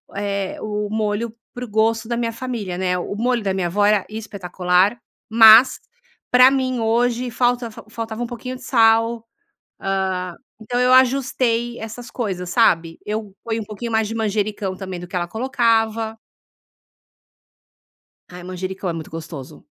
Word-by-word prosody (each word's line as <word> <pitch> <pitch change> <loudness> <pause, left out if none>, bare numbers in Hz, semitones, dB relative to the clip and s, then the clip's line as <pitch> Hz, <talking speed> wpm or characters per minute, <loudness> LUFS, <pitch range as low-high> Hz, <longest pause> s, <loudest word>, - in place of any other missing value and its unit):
eh, 200 -1 -2
o 210 -1 -3
molho 215 +1 -2 0.2
para 245 0 -6
o - - -12
gosto 220 +2 +1
da 235 - -1
minha 235 -1 -1
família, 230 -7 -5
né. 180 -1 0
O 180 +3 -4
molho 235 +1 0
da 195 - 0
minha 185 -2 -1
avó 205 +4 +1
era 210 -2 +3
espetacular, 195 -1 0 0.3
mas 225 +3 +8 0.5
pra 250 +1 +8
mim 260 -2 0
hoje 240 +2 +1
falta 245 0 0
fa 215 - -12
faltava 225 +1 -5
um - - -3
pouquinho 250 +2 -6
de - - -12
sal, 230 -1 +3 0.5
ah, 190 -2 -1 0.3
então 245 +3 -3
eu 250 0 +4
ajustei 250 -2 +2
essas 225 +2 -8
coisas, 185 -7 -3
sabe? 165 -8 +2
Eu 210 -2 -4
ponho 225 -1 -2
um - - -7
pouquinho 215 +3 -6
mais 220 -1 +2
de 225 - -5
manjericão 210 -3 -2
também 185 -2 -6
do 175 - -9
que 180 - -5
ela 175 - 0
colocava. 225 -1 0 2.1
Ai, 180 0 -10
manjericão 185 +1 -5
é 170 - -2
muito 160 -1 -7
gostoso. 155 -5 -9
220 Hz, 160 wpm, -21 LUFS, 190-235 Hz, 2.1 s, mas